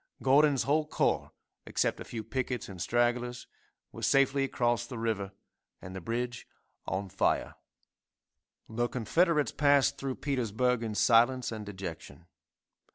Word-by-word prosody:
Gordon's 140 0 +4
whole 150 +2 +1
corps, - - 0 0.4
except - - 0
a - - -5
few 110 -2 -6
pickets 125 -1 -3
and 95 -3 -9
stragglers, 120 +4 0 0.5
were - - -10
safely 135 0 +3
across 120 -3 0
the 125 - -7
river, 110 -4 -2 0.5
and 95 0 -9
the 95 - -6
bridge 120 +4 -3 0.4
on 95 +2 -2
fire. 95 +1 0 1.1
The 120 +2 -1
Confederates 150 - +1
passed 145 -2 +3
through 135 -2 -3
Petersburg 125 -3 0
in 110 -2 -4
silence 120 +3 +3
and 110 -2 -6
dejection. 85 -6 -8
120 Hz, 130 wpm, -30 LUFS, 110-135 Hz, 1.1 s, Gordon's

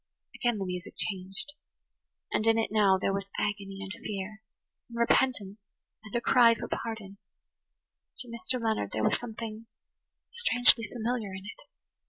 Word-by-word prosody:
Again 240 -3 0
the 195 - -2
music 180 0 -5
changed. 195 +7 -3 0.8
And 215 - +1
in 225 0 +5
it 225 - 0
now 205 -3 +5
there 195 - +1
was 195 -1 -2
agony 195 -1 -2
and 190 0 -6
fear–and 215 +3 -8
repentance 225 -4 +2 0.4
and 215 0 -9
a - - +3
cry 235 -2 +6
for - - -5
pardon. 215 -4 -5 1.0
To 250 - -6
Mr. 235 +2 -2
Leonard 220 - -1
there 110 - -1
was - - +3
something 225 -1 -7 0.6
strangely 245 - +5
familiar 230 -3 -2
in 190 0 -8
it. 205 - -10
215 Hz, 145 wpm, -29 LUFS, 195-235 Hz, 1.0 s, cry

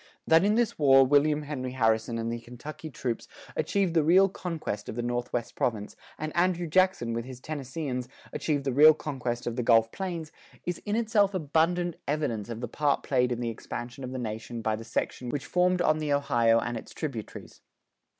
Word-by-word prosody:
That 160 +2 +5
in 210 +2 +3
this 235 -6 +1
war 135 -2 +7
William 145 +2 +3
Henry 130 -4 -4
Harrison 110 -1 +1
and 115 0 -2
the 120 - -4
Kentucky 130 +7 -9
troops 125 -4 -4 0.3
achieved 195 -4 0
the 160 -2 +3
real 185 +5 +5
conquest 165 - -5
of - - -5
the 120 - -2
northwest 120 0 -2
province 105 -4 -2 0.2
and 155 +1 -5
Andrew 175 0 +2
Jackson 185 -8 +2
with 115 0 -2
his 130 -1 -9
Tennesseeans 135 -2 -4 0.3
achieved 145 -3 -1
the 135 -2 -1
real 155 +3 +8
conquest 125 -6 -4
of 120 0 -3
the - - +1
Gulf 115 -1 +4
Plains, 170 -5 -4 0.3
is 175 - -3
in 205 - +1
itself 215 -4 +2
abundant 170 +2 +1
evidence 130 -8 -1
of 115 0 -5
the 120 - -3
part 145 +4 0
played 125 -2 +1
in 120 0 -2
the 120 -1 -1
expansion 120 +3 -7
of 125 - -5
the 130 - -4
nation 115 0 -5
by 110 0 +1
the 110 - -8
section 125 +2 -3
which 140 +2 -3
formed 180 0 +2
on 155 -1 +3
the 150 -1 -2
Ohio 120 -5 +3
and 120 - -3
its - - -10
tributaries. 135 -9 -6
140 Hz, 195 wpm, -28 LUFS, 120-160 Hz, 0.3 s, real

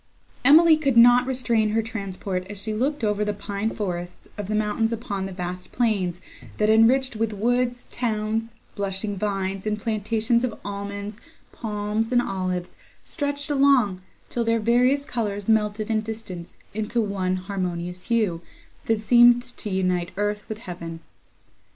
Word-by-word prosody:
Emily 315 +4 +7
could 275 -6 +1
not 245 +1 +7
restrain 235 -4 +1
her 225 +1 +1
transport 195 -4 -4
as 205 -1 -6
she 215 +2 -2
looked 265 +4 -1
over 210 -1 +1
the 210 -1 -1
pine 200 +2 -3
forests 180 -5 -5
of 205 -3 -5
the 215 - -1
mountains 215 +1 +1
upon 200 -4 -3
the - - -7
vast 180 0 -6
plains, 195 -7 0 0.4
that, 210 0 +3
enriched 240 +3 +4
with 220 0 -1
woods, 245 +3 0
towns, 225 -1 -2 0.2
blushing 200 +1 -2
vines, 195 0 -2
and 210 0 0
plantations 225 +2 0
of 245 -4 -2
almonds, 200 +1 -5 0.3
palms, 215 +1 -2
and 245 - +4
olives, 185 -5 -2 0.3
stretched 285 -1 -3
along, 270 -9 +3 0.3
till 240 - -1
their 230 0 +2
various 250 +5 +3
colours 210 -8 -3
melted 215 0 +1
in 215 -1 +2
distance 215 -6 -7 0.2
into 220 +3 -1
one 195 -4 0
harmonious 180 -2 -4
hue, 215 -8 +1 0.4
that 225 -1 +1
seemed 240 +1 +6
to 245 -4 -4
unite 185 -2 0
earth 205 0 -1
with 220 - -4
heaven. 170 -3 -7
215 Hz, 150 wpm, -24 LUFS, 195-235 Hz, 0.4 s, Emily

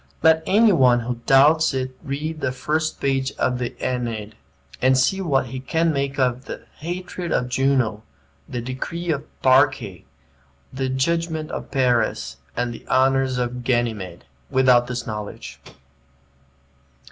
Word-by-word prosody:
Let 160 0 +5
any 215 +2 +5
one 125 -8 +4
who 120 0 -4
doubts 150 +2 +5
it 130 0 -3
read 155 +3 -4
the 130 - 0
first 155 +4 -2
page 135 -1 0
of 125 -1 -1
the 120 -1 -4
"Aeneid," 115 -4 -3 0.5
and 130 +1 +4
see 190 +9 +2
what 140 -8 +1
he 130 +2 -6
can 160 +5 0
make 140 -1 -2
of 125 -1 0
"the - - -7 0.2
hatred 175 +1 -5
of 125 - 0
Juno," 125 -4 +1 0.5
the 125 - -3
"decree 165 +8 -4
of 145 -3 -1
the - - -22 0.2
Parcae," 130 -8 +3 0.7
the 130 0 -2
"judgment 160 +3 -1
of - - -6
Paris," 120 - 0 0.2
and 120 0 -1
the - - -11
"honors 130 0 +2
of 125 0 -3
Ganymede," 115 -8 -1 0.2
without 125 -2 +4
this 125 -1 -4
knowledge. 105 -2 -7
130 Hz, 145 wpm, -22 LUFS, 125-150 Hz, 0.7 s, Let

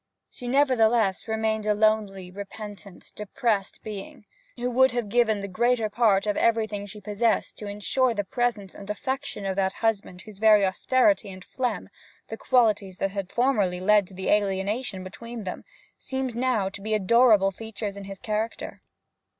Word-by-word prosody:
She 245 - -8
nevertheless 240 -7 +2
remained 220 -1 -1
a 210 - +3
lonely, 205 -4 +1
repentant, 200 -1 -9
depressed 210 -1 -2
being, 210 0 -8 0.3
who 245 +1 -2
would 260 +1 +4
have 240 -4 -2
given 220 -2 +2
the 200 - -4
greater 225 +2 +1
part 205 -4 +3
of 210 -1 0
everything 215 -3 +1
she 210 +1 -9
possessed 210 +2 -1
to 210 - -6
ensure 230 +5 0
the 205 - -1
presence 215 -2 -2
and 200 0 -11
affection 260 0 -3
of 190 -1 -1
that 190 -1 +1
husband 205 -5 -2
whose 210 -3 -13
very 215 -2 +6
austerity 255 - +2
and 185 -1 -10
phlegm 245 -6 -3 0.5
qualities 215 -7 +2
that 195 - -1
had 195 -2 -5
formerly 210 -8 +1
led 205 +1 +4
to 190 - -13
the 190 - -3
alienation 200 +1 0
between 230 +5 -8
them 185 - -6 0.4
seemed 265 -3 -4
now 240 -5 +1
to 195 +1 -7
be 215 +1 -1
adorable 215 -1 +4
features 215 -1 -6
in 200 -1 -8
his 195 0 -8
character. 215 +3 -4
210 Hz, 160 wpm, -26 LUFS, 195-235 Hz, 0.5 s, very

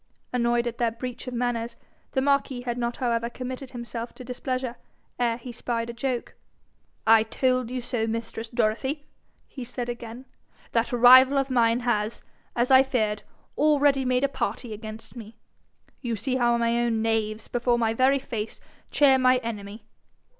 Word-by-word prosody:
Annoyed 240 -1 +2
at 235 -1 -4
their 235 -1 +3
breach 245 +3 -7
of 250 - -4
manners, 240 -1 -1 0.4
the 265 - +2
marquis 275 -2 +1
had 240 -1 -3
not 240 -1 -2
however 235 -2 0
committed 255 +2 -6
himself 235 -1 -6
to 255 - -9
displeasure 255 0 -3 0.4
ere 235 -2 +1
he 245 +1 -8
spied 235 -1 -3
a - - -11
joke: 245 0 -3 0.7
'I 225 0 +7
told 255 +1 0
you 250 -1 -4
so, 235 -2 -1
mistress 225 0 -4
Dorothy!' 245 +6 -1 0.4
he 260 - -8
said 245 0 -5
again. 240 +1 -7 0.5
'That 230 0 +1
rival 255 +3 +8
of 275 -1 0
mine 235 -1 +3
has, 220 -2 -1 0.3
as 245 +2 +1
I 260 0 +9
feared, 220 -6 0 0.3
already 285 -2 +3
made 255 0 +1
a - - +4
party 245 -4 -3
against 220 +2 -9
me. 225 -2 -10 0.6
You 235 -3 -2
see 255 +5 -1
how 240 -1 +3
my 235 0 +1
own 230 -2 +1
knaves, 220 -1 -1
before 240 0 +1
my 225 -1 +1
very 260 +4 +4
face, 225 -5 -5 0.3
cheer 270 -2 +5
my 255 0 +5
enemy! 210 -2 -6
240 Hz, 165 wpm, -26 LUFS, 230-255 Hz, 0.7 s, I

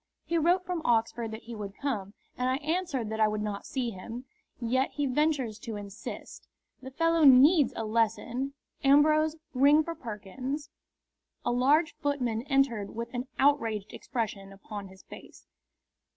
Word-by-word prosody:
He 335 0 +1
wrote 355 +3 +2
from 355 -2 -2
Oxford 230 0 +1
that 220 +1 -8
he 235 +1 -8
would 205 -2 -7
come, 210 -8 -3 0.2
and 250 +1 0
I 260 - +2
answered 310 -9 -1
that 220 - -3
I 215 - +5
would 210 0 -2
not 205 -1 -4
see 250 -3 -2
him. 230 +6 -8 0.3
Yet 260 +3 +1
he 290 - -1
ventures 265 -5 0
to 225 -1 -6
insist. 205 0 -8 0.3
The 265 - -8
fellow 330 +4 +2
needs 280 +2 +7
a 225 - -3
lesson! 230 +5 -1 0.3
Ambrose, 305 +3 +5 0.2
ring 285 +4 +5
for 335 - -4
Perkins." 255 - -6 0.7
A - - +2
large 290 +7 +3
footman 270 -7 -1
entered 245 -8 +1
with 235 +2 -5
an 245 +1 -3
outraged 225 -8 +1
expression 215 -5 -4
upon 200 +1 -8
his 190 0 -16
face. - - -13
250 Hz, 155 wpm, -29 LUFS, 220-290 Hz, 0.7 s, needs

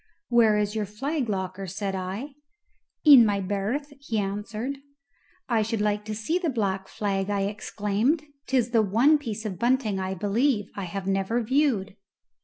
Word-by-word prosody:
"Where 230 -3 +5
is 210 0 0
your 215 -2 -2
flag 265 +5 -2
locker?" 190 -1 -3
said 195 +2 -3
I. 190 +9 -4 0.7
"In 280 -5 +10
my 205 -2 +1
berth," 205 +10 -2
he 235 -5 -3
answered. 210 +6 -3 0.7
"I 230 -3 +2
should 225 +1 -1
like 210 0 0
to 215 0 -4
see 220 +12 -1
the 345 -3 -1
black 195 -6 -1
flag," 195 -1 -2
I 200 -1 0
exclaimed: 210 +7 0 0.2
"'tis 250 -3 +1
the 230 -2 +4
one 235 +10 +4
piece 220 -5 -5
of 190 -5 -4
bunting, 235 -5 +1
I 190 0 -2
believe, 210 +3 0
I 200 - -4
have 185 +2 -5
never 195 +5 0
viewed." 225 -6 +1
210 Hz, 165 wpm, -26 LUFS, 195-245 Hz, 0.7 s, In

